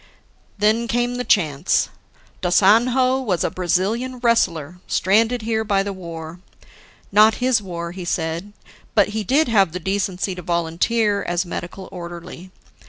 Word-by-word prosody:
"Then 215 Hz, +3 st, +2 dB
came 240 Hz, +1 st, 0 dB
the 250 Hz, -, -2 dB
chance. 160 Hz, -, +2 dB, 0.5 s
Da 180 Hz, -, 0 dB
Sanhao 250 Hz, +8 st, +4 dB
was 185 Hz, -8 st, 0 dB
a -, -, -1 dB
Brazilian 205 Hz, +9 st, -1 dB
wrestler 180 Hz, -, 0 dB
stranded 220 Hz, +5 st, +2 dB
here 220 Hz, 0 st, 0 dB
by 200 Hz, -2 st, +1 dB
the 200 Hz, 0 st, -4 dB
war. 170 Hz, -2 st, -8 dB, 0.7 s
Not 215 Hz, +2 st, +6 dB
his 250 Hz, -3 st, +2 dB
war, 170 Hz, -3 st, -6 dB
he 185 Hz, 0 st, -7 dB
said; 170 Hz, +3 st, -3 dB, 0.4 s
but 205 Hz, -2 st, +4 dB
he 215 Hz, +1 st, -3 dB
did 275 Hz, -, +2 dB
have 195 Hz, -8 st, +3 dB
the 180 Hz, -, -3 dB
decency 190 Hz, 0 st, -2 dB
to 180 Hz, -, -8 dB
volunteer 175 Hz, +6 st, 0 dB
as 175 Hz, +1 st, -1 dB
medical 175 Hz, +2 st, -6 dB
orderly. 175 Hz, 0 st, -9 dB
195 Hz, 145 wpm, -21 LUFS, 175-230 Hz, 0.7 s, Not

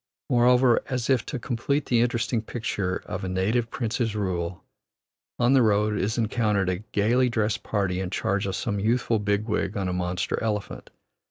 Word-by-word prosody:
Moreover, 125 Hz, 0 st, +5 dB
as 130 Hz, -2 st, -1 dB
if 130 Hz, -, +1 dB
to 145 Hz, -, -3 dB
complete 135 Hz, +4 st, -1 dB
the 120 Hz, -2 st, +2 dB
interesting 120 Hz, -1 st, 0 dB
picture 105 Hz, -5 st, -3 dB
of 95 Hz, -1 st, -5 dB
a 95 Hz, -, -2 dB
native 105 Hz, +6 st, 0 dB
prince's 115 Hz, -2 st, -2 dB
rule, 90 Hz, -4 st, -2 dB, 0.7 s
on 120 Hz, +2 st, +3 dB
the 135 Hz, -, +6 dB
road 105 Hz, -1 st, +2 dB
is 105 Hz, +3 st, -1 dB
encountered 105 Hz, -4 st, +1 dB
a 90 Hz, -1 st, -1 dB
gayly 120 Hz, +5 st, +2 dB
dressed 110 Hz, -2 st, 0 dB
party 95 Hz, -4 st, -1 dB
in 95 Hz, -1 st, -3 dB
charge 100 Hz, +1 st, -1 dB
of 95 Hz, -, -2 dB
some 100 Hz, -4 st, -2 dB
youthful 115 Hz, +1 st, +1 dB
big 105 Hz, 0 st, 0 dB
wig 105 Hz, -2 st, -1 dB
on 95 Hz, -2 st, -1 dB
a 90 Hz, -, -1 dB
monster 90 Hz, 0 st, -2 dB
elephant. 105 Hz, -2 st, -3 dB
110 Hz, 175 wpm, -25 LUFS, 100-120 Hz, 0.7 s, the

